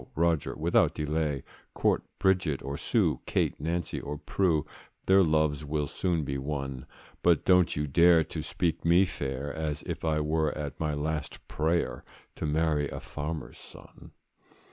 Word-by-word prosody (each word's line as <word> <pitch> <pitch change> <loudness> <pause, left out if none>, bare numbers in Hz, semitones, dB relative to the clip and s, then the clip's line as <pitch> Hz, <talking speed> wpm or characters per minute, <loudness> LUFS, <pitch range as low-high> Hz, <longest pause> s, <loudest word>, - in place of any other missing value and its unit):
Roger, 85 -2 +1
without - - +2
delay, 75 -2 -1 0.3
Court - - +2 0.2
Bridget 90 -7 +1
or 70 - -4
Sue, - - +1
Kate, - - 0
Nancy, 85 +3 -2
or 75 +1 -5
Prue, 80 -2 +1 0.4
Their 95 +1 +6
loves 75 -3 +2
will 75 0 -1
soon 85 +1 -1
be 70 -1 -3
won; 70 -2 -4 0.3
But 85 -3 +3
don't 90 -2 +4
you 75 - -1
dare 85 +3 +5
to - - -5
speak 85 -3 -2
me 85 +3 +5
fair, 70 -4 -4
As 80 -2 -3
if - - -5
I 80 -1 +1
were 75 0 0
at 75 -2 -5
my 75 -2 -1
last 75 +1 -4
prayer, 80 +2 -1 0.3
To 80 - -2
marry 75 -1 +1
a - - -6
farmer's 75 +2 -6
son. - - -14
75 Hz, 155 wpm, -29 LUFS, 75-85 Hz, 0.4 s, Their